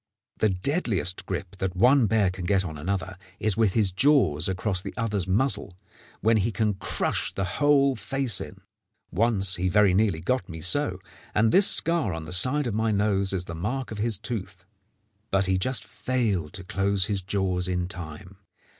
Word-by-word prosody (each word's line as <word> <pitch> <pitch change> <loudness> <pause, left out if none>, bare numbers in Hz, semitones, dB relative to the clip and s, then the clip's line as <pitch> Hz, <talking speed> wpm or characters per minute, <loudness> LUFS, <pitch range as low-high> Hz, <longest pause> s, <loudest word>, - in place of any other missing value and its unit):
The 110 - +2
deadliest 95 - -1
grip 95 0 -5
that 95 -1 -3
one 125 +5 +5
bear 105 -3 +2
can 90 -1 -6
get 95 0 +2
on 80 -3 -6
another 95 +3 -4 0.2
is 110 -3 +2
with 110 -4 +2
his 105 -4 +2
jaws 95 - +3
across 95 0 0
the - - -7
other's 105 -5 -1
muzzle, 100 -3 0 0.4
when 110 +1 +3
he 110 +3 0
can 110 -1 0
crush 95 - -2
the 95 - -1
whole 140 +7 +2
face 135 -6 -2
in. - - -9 0.5
Once 100 -2 +1
he 90 +1 0
very 100 0 +4
nearly 100 -4 +2
got 125 +6 -1
me 80 -1 -7
so, 95 - +1 0.4
and 110 +1 +3
this 195 +1 +6
scar 165 - +1
on 80 -1 -6
the 80 - -6
side 130 +10 0
of 120 - -2
my 110 +1 0
nose 100 -2 +1
is 90 -2 -2
the 85 - -7
mark 110 +11 -3
of 110 - -6
his 110 -1 0
tooth; 95 -5 -6 0.6
but 95 0 +2
he 95 0 +1
just 130 +7 0
failed 105 -11 -2
to 95 -1 -7
close 100 0 +1
his 100 -2 -2
jaws 95 -1 -1
in 90 -1 -1
time. 90 +1 -8
100 Hz, 185 wpm, -26 LUFS, 90-115 Hz, 0.6 s, this